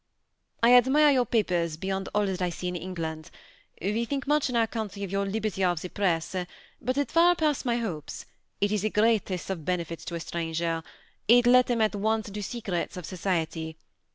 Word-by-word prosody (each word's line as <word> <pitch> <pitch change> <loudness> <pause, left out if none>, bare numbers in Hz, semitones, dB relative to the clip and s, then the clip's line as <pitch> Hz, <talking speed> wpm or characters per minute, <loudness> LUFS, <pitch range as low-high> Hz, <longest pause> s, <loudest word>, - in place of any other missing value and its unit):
^ - - +7
I 245 - +7
admire 270 +5 +6
your 255 -3 +2
papers 175 -8 0
beyond 190 +2 -3
all 210 0 +3
that 190 -2 -3
I 180 - +1
see 175 +1 -5
in 180 - -4
Eng 185 +1 -5
land. 160 0 -5 0.5
We 210 +6 0
think 275 +3 -3
much 295 -1 +2
in 250 - -3
our 230 -1 +4
country 210 -3 -5
of 195 - -5
your 200 0 0
liberty 205 -2 -2
of 175 -3 +2
the 180 - -6
press; 180 -3 0 0.5
but 255 +3 -1
it 285 - 0
far 345 +1 +5
pass' 305 -5 0
my 240 -2 +1
hopes. 180 -11 -5 0.3
It 205 0 +1
is 210 -2 +1
the 215 - 0
great 220 0 +2
est 185 0 -3
of 170 -5 -4
benefits 170 -1 -3
to 170 - -4
a - - -3
stranger: 165 0 -2 0.5
it 245 +2 +6
let 250 +1 +6
him 235 -2 +1
at 215 0 +2
once 215 +1 0
into 210 +1 -5
secrets 195 -5 -3
of 180 - -6
society. 165 -3 -2
200 Hz, 210 wpm, -27 LUFS, 175-235 Hz, 0.5 s, ^